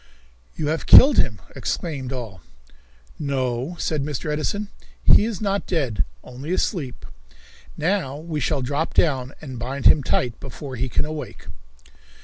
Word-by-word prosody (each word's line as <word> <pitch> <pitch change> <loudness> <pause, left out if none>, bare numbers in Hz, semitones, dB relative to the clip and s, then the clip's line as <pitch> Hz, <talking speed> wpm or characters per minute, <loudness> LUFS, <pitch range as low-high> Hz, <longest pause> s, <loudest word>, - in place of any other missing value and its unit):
"You 150 - -2
have 160 +1 -2
killed 275 +1 +9
him!" 105 -8 +1 0.2
exclaimed 140 -7 -3
all. 115 -9 -6 0.8
"No," 130 +1 -2
said 155 -4 -1
Mr. 150 +1 -3
Edison, 200 +7 -2 0.3
"he 210 - +6
is 225 -4 -3
not 200 -1 -1
dead, 135 - 0 0.2
only 130 +6 -7
asleep. 165 - -2 0.7
Now 165 -5 0
we 155 0 -4
shall 145 -2 0
drop 145 +5 -2
down 135 -5 +2
and 130 -6 -7
bind 130 +3 -4
him 150 - +7
tight 125 -2 -1
before 135 -3 -7
he 125 +2 -2
can - - 0
awake." 155 0 -7
145 Hz, 140 wpm, -23 LUFS, 130-160 Hz, 0.8 s, killed